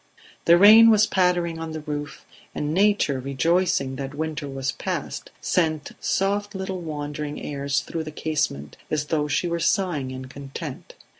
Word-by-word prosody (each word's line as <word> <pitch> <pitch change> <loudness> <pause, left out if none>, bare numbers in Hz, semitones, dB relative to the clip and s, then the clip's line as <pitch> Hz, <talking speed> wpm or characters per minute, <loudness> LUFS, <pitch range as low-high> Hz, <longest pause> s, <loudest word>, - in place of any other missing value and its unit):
The 170 +1 +7
rain 220 +4 +9
was 215 -1 +6
pattering 175 -4 +1
on 160 -1 -5
the 155 - -5
roof, 145 -1 -6 0.3
and 150 +1 -2
nature, 195 -8 +2
rejoicing 140 0 +1
that 135 +1 -5
winter 155 -2 -3
was 135 0 -2
past, - - -4
sent 155 -4 0
soft 205 +1 0
little 190 -1 -4
wandering 150 -2 -5
airs 140 -1 -2
through 165 -1 -5
the 155 - -6
casement 145 - -2
as 150 -1 -1
though 150 -1 0
she 145 +4 0
were 170 0 -1
sighing 170 -6 0
in 130 0 -7
content. 135 +1 -8
155 Hz, 155 wpm, -24 LUFS, 140-180 Hz, 0.3 s, rain